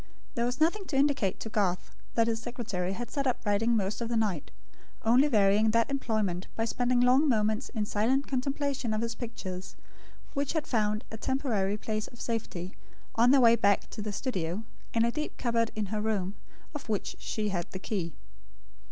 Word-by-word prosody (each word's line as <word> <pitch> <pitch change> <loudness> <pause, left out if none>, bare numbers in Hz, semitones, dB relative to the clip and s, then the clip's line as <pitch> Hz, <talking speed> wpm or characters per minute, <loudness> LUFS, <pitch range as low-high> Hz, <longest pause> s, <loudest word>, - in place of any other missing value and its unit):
There 235 - 0
was 245 +3 -2
nothing 345 +6 +2
to 315 - -4
indicate 275 -9 +2
to 220 - -4
Garth 195 -4 0 0.2
that 230 - +4
his 225 -1 -1
secretary 210 -7 -3
had 240 +4 -5
sat 280 -2 0
up 255 - +2
writing 225 +3 +3
most 200 +2 -1
of 230 - -2
the 235 - +1
night; 205 -9 0 0.5
only 245 +6 +5
varying 210 -3 +4
that 230 +4 +2
employment 215 -9 -1
by 225 - 0
spending 245 +1 +1
long 260 +5 +5
moments 220 +1 +1
in 215 -3 -2
silent 240 +7 +1
contemplation 270 -3 -1
of 215 - -1
his 230 0 -1
pictures, 190 -7 -6 0.6
which 280 0 -1
had 315 -2 0
found 215 -4 +1
a 220 - -5
temporary 215 -6 0
place 215 0 -2
of 240 - -15
safety, 195 -6 -3 0.4
on 235 +2 +5
their 270 0 +6
way 230 -1 +7
back 200 -3 +2
to - - -5
the 210 0 -3
studio, 195 - -2 0.3
in 230 0 +3
a 235 - +2
deep 305 +3 -4
cupboard 230 -2 +1
in 215 -1 -1
her 210 - 0
room, 205 -3 0 0.4
of 290 -6 -7
which 210 -3 -1
she 215 -1 -2
had 175 -3 -2
the - - -5
key. 185 -4 -3
225 Hz, 190 wpm, -30 LUFS, 205-250 Hz, 0.6 s, way